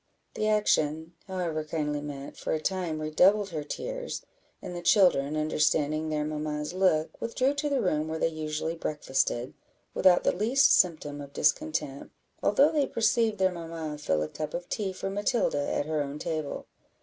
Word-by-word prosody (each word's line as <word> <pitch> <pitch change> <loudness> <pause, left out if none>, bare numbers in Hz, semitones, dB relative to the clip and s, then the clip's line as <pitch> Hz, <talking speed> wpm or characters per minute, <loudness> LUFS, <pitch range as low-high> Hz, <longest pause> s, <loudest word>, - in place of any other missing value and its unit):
The 215 - -1
action, 160 -6 +1
however 175 -5 -2
kindly 150 -2 -2
meant, 140 -1 -7
for - - -3
a 160 - 0
time 175 -1 -2
redoubled 190 +7 +3
her 155 -3 -3
tears; - - -5 0.4
and 180 - -7
the 175 - -5
children, 170 -6 +4
understanding 155 0 +1
their 150 -1 -1
mamma's 150 +1 -3
look, 180 -4 +1
withdrew 255 +4 +1
to 290 +1 -2
the 275 -3 +1
room 155 -4 0
where 160 0 -3
they - - +2
usually 155 0 -3
breakfasted, 135 -6 -1 0.4
without 180 -2 +4
the - - +2
least 235 +8 +4
symptom 155 -5 +2
of 140 0 -10
discontent, 150 - 0 0.3
although 275 +9 +4
they 295 -3 +1
perceived 225 -1 +1
their 190 0 +3
mamma 165 -3 -6
fill 80 - 0
a - - -3
cup 155 - -5
of 175 0 -5
tea 200 -3 -2
for 195 +1 -4
Matilda 205 - 0
at - - 0
her 155 -1 -1
own 140 0 -4
table. 155 -2 -4
160 Hz, 170 wpm, -28 LUFS, 150-195 Hz, 0.4 s, children